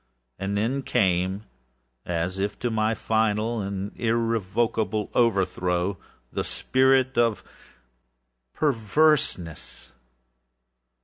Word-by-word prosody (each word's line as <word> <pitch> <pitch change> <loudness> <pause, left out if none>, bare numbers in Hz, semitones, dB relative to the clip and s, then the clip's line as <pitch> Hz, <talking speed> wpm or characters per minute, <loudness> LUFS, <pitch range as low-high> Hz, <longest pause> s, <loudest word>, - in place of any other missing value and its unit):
And 100 +1 -2
then 120 +7 0
came, 95 -2 +1 0.6
as 90 +2 -2
if 100 +1 -2
to 120 - -2
my 110 0 +1
final 110 +1 0
and 100 +1 -4
irrevocable 115 -1 0
overthrow, 95 -4 +1 0.3
the - - -1
spirit 130 -1 +2
of 115 -3 +2 1.1
PERVERSENESS. 120 - +1
110 Hz, 80 wpm, -25 LUFS, 95-115 Hz, 1.1 s, spirit